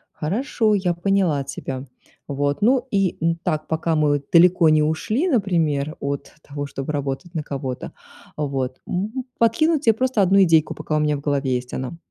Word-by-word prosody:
Хорошо, 215 - 0
я 185 -3 +1
поняла 175 -5 +1
тебя. 135 -1 -6 0.4
Вот, 145 0 -1
ну 255 +3 +3
и, 195 -3 +1
м, 165 0 +2
так, 155 -3 -2
пока 160 +1 0
мы 145 -2 +2
далеко 170 -1 +6
не 155 0 +4
ушли, 215 - 0
например, 165 - 0
от 140 0 -4
того, 145 0 -5
чтобы 135 +1 -5
работать 145 +5 -4
на 155 - -2
кого-то, 135 -3 -5 0.4
вот, 135 -3 -3
м, 220 +8 -3
подкинуть 290 +7 +2
те 225 - +6
просто 255 -1 0
одну 195 +1 +5
идейку, 160 -3 +3
пока 155 - -3
у - - +2
меня 150 -1 +1
в 140 - -7
голове 140 -2 0
есть 125 0 -4
она 130 +5 -4
160 Hz, 175 wpm, -22 LUFS, 140-195 Hz, 0.4 s, далеко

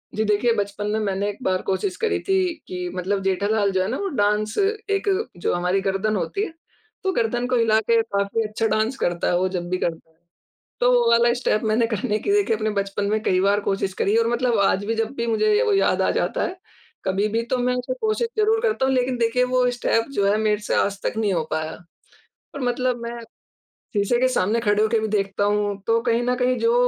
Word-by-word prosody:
जी, 220 - +1
देखिए 210 +3 +2
बचपन 205 0 -3
में 220 - 0
मैंने 200 -1 -1
एक 205 - -6
बार 185 0 0
कोशिश 365 - -1
करी 450 -2 0
थी 385 - +2 0.3
कि 180 -1 -4
मतलब 195 +2 -1
जेठालाल 200 +2 +1
जो 190 -1 +1
है 190 - 0
ना, 255 - -2
वो 400 - -2
डांस 210 - 0 0.3
एक 400 0 0 0.3
जो - - -1
हमारी 180 +2 0
गर्दन 195 +2 0
होती 395 - -2
है 330 - -9 0.5
तो 380 - +1
गर्दन 240 -2 0
को 255 - 0
हिला 220 -2 +3
के 230 +1 +3
काफ़ी 200 +2 -1
अच्छा 215 +1 -2
डांस 220 +5 0
करता 175 -6 -1
है, 175 - +2
वो 185 - +1
जब 175 -2 -4
भी 185 - 0
करता, 165 -2 -4 0.7
तो 245 +1 +4
वो 240 -1 +4
वाला 235 0 +4
स्टेप 245 -3 0
मैंने 230 +1 +2
करने 215 0 -1
की 400 - -1
देखिए 405 - +2
अपने 215 0 -1
बचपन 200 +1 -2
में 215 0 0
कई 185 -1 +2
बार 200 +1 +3
कोशिश 195 -1 -1
करी 205 +3 +2
और 230 0 +3
मतलब 240 -2 +1
आज 195 0 +2
भी 225 +2 -1
जब 225 +2 -2
भी 235 0 -2
मुझे 425 - +2
वो 430 -4 +2
याद 390 - +2
आ - - +2
जाता - - -1
है 365 0 -6 0.5
कभी 195 +3 +1
भी 230 +1 +1
तो - - +2
मैं 250 0 +1
उसे 250 +1 -3
कोशिश 440 +2 0
ज़रूर 440 +1 +3
करता 440 - +1
हूँ। 265 - +1
लेकिन 250 0 0
देखिए, 240 +2 +2
वो 250 0 +2
स्टेप 230 -2 0
जो 200 -6 +1
है 210 - +2
मेरे 210 -1 +1
से - - -1
आज 200 -1 0
तक - - -1
नहीं 210 -3 +1
हो 165 -2 0
पाया 160 0 -2 0.8
और 280 - -5
मतलब 250 0 0
मैं 235 0 -5 0.8
शीशे 205 +4 +1
के 255 - +4
सामने 225 -2 +1
खड़े 210 -2 +2
होके 220 +1 +2
भी 220 - -2
देखता 200 -1 0
हूँ 205 -1 0
तो 230 0 +3
कहीं 235 -1 +1
न 250 0 +1
कहीं 250 0 +2
जो 230 +1 +2
220 Hz, 230 wpm, -23 LUFS, 200-245 Hz, 0.8 s, तो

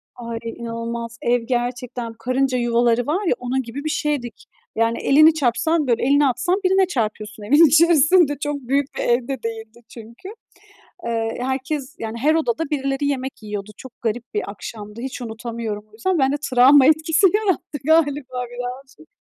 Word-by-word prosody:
Ay, 230 -1 -6
e, - - -6
inanılmaz. 230 0 -6
Ev 240 0 +1
gerçekten 245 -1 -3
karınca 255 +2 0
yuvaları 240 0 +2
var 370 +7 -1
ya, 330 - +3
onun 255 +1 -2
gibi 260 +4 -8
bir 310 - -1
şeydik. 285 -8 -3 0.3
Yani 230 +1 +1
elini 310 +3 +5
çarpsan, 310 +3 +1
böyle 235 -2 +1
elini 285 +3 +4
atsan 265 +8 +1
birine 380 0 +4
çarpıyorsun 215 - -4
evin 290 +10 +6
içerisinde. 320 -1 +4
Çok 295 0 -2
büyük 275 +2 -1
bir - - -1
ev 240 +1 +1
de 265 -4 -4
değildi 225 0 -7
çünkü. 230 - -12 0.8
Iıı, 225 -1 -1
herkes, 265 +1 -3
yani 225 +1 -5
her 300 +6 +2
odada 315 0 -1
birileri 275 -1 -1
yemek 265 -3 -3
yiyordu. 210 -1 -6
Çok 260 - -11
garip 235 +1 -3
bir 210 - -2
akşamdı. 210 +1 -9
Hiç 255 0 -6
unutamıyorum 225 -2 -5
o - - -35
yüzden. 345 +12 -1
Ben 270 -1 +2
de 290 - 0
travma 260 +2 +6
etkisi 315 +4 +4
yarattı 395 -8 -1
galiba 285 -5 +1
birazcık. 245 - -8
250 Hz, 165 wpm, -21 LUFS, 230-290 Hz, 0.8 s, evin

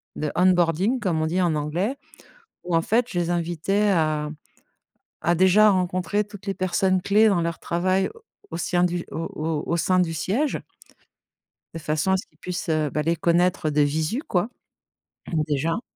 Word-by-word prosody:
de 150 -1 -2
onboarding 180 +6 +3
comme 170 -7 0
on - - +1
dit 180 +3 0
en 170 -3 +1
anglais, 175 - -2 0.7
où 175 -1 -1
en 165 - +4
fait 235 +6 +1
je 175 - -2
les 170 0 -1
invitais 175 +4 0
à 155 -4 +1 0.9
à 175 - +3
déjà 190 +4 +5
rencontrer 185 +2 0
toutes 205 -1 -13
les 195 - -1
personnes 185 0 +1
clés 215 +4 +4
dans 175 -4 +2
leur 170 0 -3
travail 185 +3 0 0.4
au - - -5
sien 175 0 +1
du 175 -1 -1
au 160 - -4 0.2
au 155 -1 -2
au 170 - 0
sein 185 +2 +2
du 165 -2 +1
siège 245 - -1 1.2
de - - -4
façon 155 +4 0
à - - +4
ce 185 - -6
qu'ils - - -34
puissent 180 -1 -5
heu, 155 -2 +1
bah 150 - -1
les 165 +1 +1
connaître 170 0 +2
heu, - - 0
de 150 0 +1
visu 155 - 0
quoi, 180 +4 0 1.0
déjà. 160 - 0
175 Hz, 180 wpm, -24 LUFS, 160-190 Hz, 1.2 s, déjà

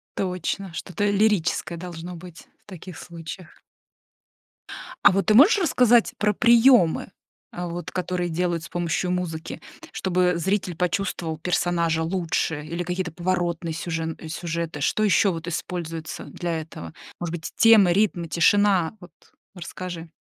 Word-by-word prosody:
Точно, 185 +1 -3
что-то 205 +4 -2
лирическое 200 -4 +1
должно 175 0 -7
быть 170 -1 -12 0.2
в - - -57
таких 185 -3 -10
случаях. 170 0 -10 1.4
А - - +7
вот 195 -1 0
ты 215 - +5
можешь 300 - +7
рассказать 245 - +3
про 210 0 +1
приемы, 235 -6 +4 0.4
э, 175 0 -5
вот 170 -1 -6
которые 180 -1 -2
делают 170 0 -1
с - - -9
помощью 175 +1 -1
музыки, 170 -3 -4 0.3
чтобы 180 -1 +1
зритель 185 0 -1
почувствовал 175 -2 -2
персонажа 170 -1 0
лучше, 165 -3 -1
или 170 +3 -4
какие-то 180 0 -3
поворотные 175 -1 -2
сюжен 165 -1 -4
сюжеты? 165 -2 -4
Что 215 - +1
еще 195 -1 +4
вот 165 0 -6
используется 165 -2 -5
для 170 -2 -4
этого? 85 - -10 0.3
Может 175 -2 -4
быть, 160 -1 -7
темы, 215 -6 +6
ритмы, 180 -4 +1
тишина? 190 +1 +3
Вот 175 -1 -14 0.4
расскажи. 175 -1 -7
175 Hz, 135 wpm, -24 LUFS, 165-190 Hz, 1.4 s, А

